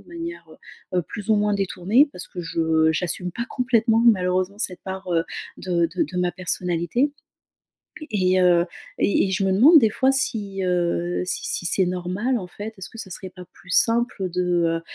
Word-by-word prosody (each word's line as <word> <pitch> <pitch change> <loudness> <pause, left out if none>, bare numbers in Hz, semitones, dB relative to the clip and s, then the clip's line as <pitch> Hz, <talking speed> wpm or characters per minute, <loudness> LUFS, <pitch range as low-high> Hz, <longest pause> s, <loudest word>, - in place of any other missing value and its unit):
de - - -21
manière, 340 0 -7
heu 185 - -7
heu, - - +1
plus 210 +5 -6
ou 215 - +5
moins 210 0 +1
détournée, 200 +6 +2
parce 180 - -5
que 180 - -7
je 160 -1 +1
j'assume 180 +2 -2
pas 235 +6 -4
complètement 230 -3 +2
malheureusement 185 -2 +2
cette 185 -5 -3
part, 190 0 -6
heu, 165 -1 +2 0.4
de 175 -2 +1
de - - +2
de 180 - -5
ma 180 0 +1
personnalité. 180 - -1 1.0
Et 185 -2 +2
heu, 175 -1 +4 0.3
et 200 - +2
et - - -3
je 190 +1 0
me 190 - +2
demande 280 - +7
des 225 -5 +3
fois 265 +5 +2
si, 205 -7 -2
heu, 175 -1 0
si 185 - -3
si - - -2
c'est 190 +2 +2
normal 185 +8 -1
en 185 - -7
fait, 205 +4 -8
est-ce 190 - -8
que - - -13
ça 195 -4 -8
serait 185 +1 -7
pas 180 0 -12
plus 180 - -19
simple, 230 -3 +2
de, 175 -2 +1
185 Hz, 195 wpm, -23 LUFS, 180-220 Hz, 1.0 s, demande